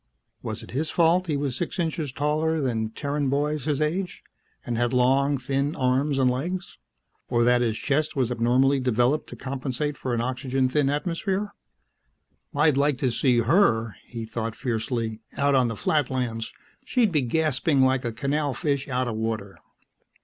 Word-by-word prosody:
Was - - -5
it - - -11
his 150 +6 -1
fault 170 +2 +3
he 150 -3 0
was 140 -3 -2
six 175 +7 -3
inches 160 -4 -2
taller 155 +4 0
than 115 -6 -1
Terran 140 +3 -2
boys 145 +1 0
his 150 -2 0
age, 175 +4 -2 0.4
and 120 - -2
had 120 +1 0
long, 135 +3 +3
thin 140 +4 -1
arms 135 +2 +1
and 130 -1 +3
legs? 175 +9 -2 0.5
Or 120 -1 +2
that 125 0 +4
his 115 -2 0
chest 150 +5 0
was 125 -3 +1
abnormally 125 +4 +3
developed 125 +4 +1
to - - -8
compensate 135 +2 -3
for 125 -2 -1
an - - -1
oxygen 130 +2 0
thin 140 +1 +2
atmosphere? 190 +7 -2 1.0
I'd 150 -1 +3
like 140 -1 +2
to 130 -3 0
see 120 0 +3
her, 115 - +3
he 115 -2 -6
thought 110 0 -4
fiercely, 115 -2 -2 0.2
out 140 0 +2
on 130 -2 +4
the 115 -2 -4
Flatlands; 125 -6 -1 0.3
she'd 235 -6 +2
be 150 -4 +2
gasping 145 +1 +1
like 130 0 +2
a 120 - -2
canal 140 +4 -1
fish 140 -4 -1
out 130 0 0
of 115 - -2
water. 110 -3 -3
135 Hz, 170 wpm, -25 LUFS, 120-150 Hz, 1.0 s, that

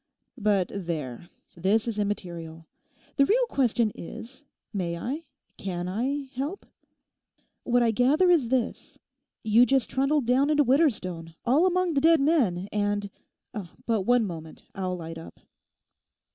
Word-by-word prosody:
But 200 -4 +1
there, 165 -6 -5 0.3
this 200 +6 +1
is 220 -2 -2
immaterial. 170 -5 -4 0.5
The 275 - +6
real - - +3
question 240 - +1
is, 235 - -10 0.3
may 175 -4 -2
I, 280 - -4 0.3
can 180 -2 -4
I 260 +9 -1
help? 285 +9 -4 1.0
What 245 0 +3
I 230 - +3
gather 280 - +3
is 290 -10 +3
this: 255 -2 -2 0.5
You 220 +2 +5
just 270 -3 +1
trundled 275 +1 +1
down 260 +4 +3
into 300 -1 +4
Widderstone 205 - +1
all 290 +9 +4
among 365 -1 +1
the 275 - +1
dead 325 +1 +5
men, 245 - +2
and—but 205 +1 -4
one 245 +3 +3
moment, 160 -4 -8
I'll 185 -2 -3
light 165 -1 -7
up. 165 - -12
225 Hz, 130 wpm, -27 LUFS, 185-275 Hz, 1.0 s, The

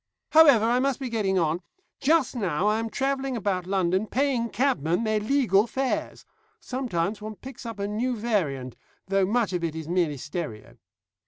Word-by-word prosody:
"However, 285 -9 +7
I 240 +2 +3
must 275 0 0
be 265 -2 -4
getting 200 -4 0
on. 165 0 +1 0.4
Just 295 -2 +2
now 185 -6 -1
I 210 +1 +2
am 225 0 -3
travelling 270 0 -1
about 185 -4 -1
London 190 +1 +1
paying 255 -2 0
cabmen 225 - +1
their 215 -1 +1
legal 215 -3 +2
fares. 265 +2 -2 0.3
Sometimes 215 -6 -2
one 215 0 -6
picks 260 +1 -10
up 225 -2 -6
a 200 0 -2
new 240 +5 -1
variant, 160 - -1 0.3
though 195 -1 +1
much 220 -2 +1
of 175 -1 -2
it 160 -2 -2
is 160 -1 -6
merely 170 -4 0
stereo." 120 - -6
210 Hz, 170 wpm, -26 LUFS, 180-250 Hz, 0.4 s, However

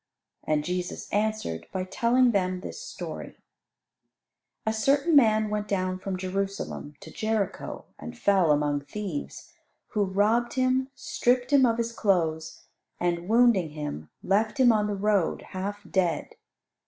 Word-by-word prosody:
And 150 -1 +1
Jesus 180 +2 -3
answered 205 - -1
by 185 - -2
telling 240 +6 +3
them 185 -3 0
this - - -7
story: - - -7 1.3
A 220 - +1
certain 280 +8 +2
man 220 -5 +5
went 210 0 -2
down 185 -2 -1
from 190 0 -4
Jerusalem 190 -5 -4
to 160 - -11
Jericho, 215 -1 -2
and 80 +1 -8
fell 195 -5 +3
among 145 -1 +1
thieves, 210 - -6 0.4
who 210 -3 +1
robbed 210 +5 +1
him, 260 0 +1
stripped 250 +2 0
him 265 -3 +6
of 230 -1 +1
his 235 0 -1
clothes, 165 -8 0 0.4
and, 175 0 -1
wounding 225 -7 +4
him, 145 - -5
left 215 +6 +1
him 250 -2 +7
on 210 -2 +2
the 205 - -2
road 200 -3 +1
half 200 +2 -4
dead. 175 -5 0
200 Hz, 140 wpm, -27 LUFS, 180-230 Hz, 1.3 s, him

